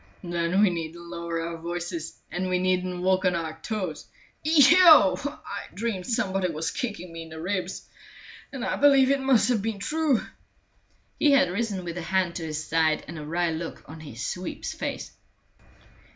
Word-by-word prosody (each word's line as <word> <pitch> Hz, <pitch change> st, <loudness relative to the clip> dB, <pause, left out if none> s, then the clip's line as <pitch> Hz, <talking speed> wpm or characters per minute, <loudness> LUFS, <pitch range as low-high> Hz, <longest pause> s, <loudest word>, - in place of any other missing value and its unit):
"Then 175 Hz, +2 st, +1 dB
we 200 Hz, -, +4 dB
needn't 165 Hz, 0 st, -5 dB
lower 170 Hz, -1 st, -4 dB
our 165 Hz, 0 st, -4 dB
voices, 170 Hz, -1 st, -5 dB
and 185 Hz, +1 st, -2 dB
we 180 Hz, -, +2 dB
needn't 180 Hz, 0 st, 0 dB
walk 185 Hz, 0 st, +2 dB
on 180 Hz, -2 st, +2 dB
our 160 Hz, -1 st, -4 dB
toes. 185 Hz, -5 st, -4 dB, 0.4 s
Eheu! 310 Hz, -, +7 dB, 0.3 s
I 315 Hz, -, -6 dB
dreamed 200 Hz, -3 st, -3 dB
somebody 195 Hz, -5 st, 0 dB
was 160 Hz, +1 st, -3 dB
kicking 205 Hz, -8 st, -5 dB
me 165 Hz, -, -7 dB
in 165 Hz, -, -10 dB
the 160 Hz, 0 st, -9 dB
ribs, 185 Hz, +1 st, -3 dB, 0.6 s
and 260 Hz, -3 st, -5 dB
I -, -, -1 dB
believe 275 Hz, -2 st, +5 dB
it 275 Hz, -1 st, +1 dB
must 265 Hz, -3 st, +3 dB
have 235 Hz, -5 st, +2 dB
been 220 Hz, 0 st, -2 dB
true." 300 Hz, +3 st, +1 dB, 1.0 s
He 290 Hz, -2 st, +5 dB
had 275 Hz, -7 st, +4 dB
risen 200 Hz, -2 st, -2 dB
with 170 Hz, 0 st, -5 dB
a -, -, -4 dB
hand 180 Hz, +1 st, 0 dB
to 170 Hz, -, -5 dB
his 155 Hz, 0 st, -4 dB
side 160 Hz, -1 st, +1 dB
and 160 Hz, 0 st, -7 dB
a -, -, -7 dB
wry 170 Hz, +2 st, 0 dB
look 160 Hz, +1 st, -6 dB
on 160 Hz, +2 st, -10 dB
his 135 Hz, -6 st, -7 dB
sweep's 180 Hz, -1 st, -4 dB
face. -, -, -5 dB
180 Hz, 180 wpm, -26 LUFS, 165-220 Hz, 1.0 s, Eheu